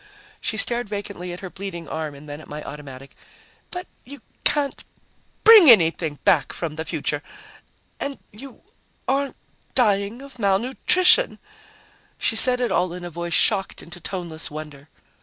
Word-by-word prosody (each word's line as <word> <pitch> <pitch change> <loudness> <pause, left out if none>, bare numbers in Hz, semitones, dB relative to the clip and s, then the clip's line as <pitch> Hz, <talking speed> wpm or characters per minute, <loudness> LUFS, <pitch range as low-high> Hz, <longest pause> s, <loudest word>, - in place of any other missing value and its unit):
She 220 - -3
stared 235 -1 +1
vacantly 200 -3 -5
at 175 - -8
her 190 -2 -7
bleeding 185 -4 -7
arm 155 -2 -5
and 145 +2 -13
then 145 +1 -8
at - - -14
my 150 +1 -7
automatic. 140 -2 -10 0.5
"But 360 0 -6 0.2
you 280 0 -12 0.2
can't 290 -2 0 0.6
bring 435 -9 +9
anything 165 -7 +5
back - - +3
from 160 -3 -4
the 160 +1 -5
future. 150 -3 -3 0.8
And 280 -1 -3
you 255 +4 -12 0.4
aren't 275 +1 0 0.4
dying 210 0 +1
of 275 -3 -12
malnutrition." 255 - +3 0.8
She 225 - 0
said 250 +2 +5
it 245 -2 -1
all 180 0 0
in 180 0 -8
a 175 - -7
voice 170 +1 -3
shocked 195 -3 +2
into 175 +1 -10
toneless 170 -2 -5
wonder. 150 -1 -9
190 Hz, 150 wpm, -23 LUFS, 160-245 Hz, 0.8 s, bring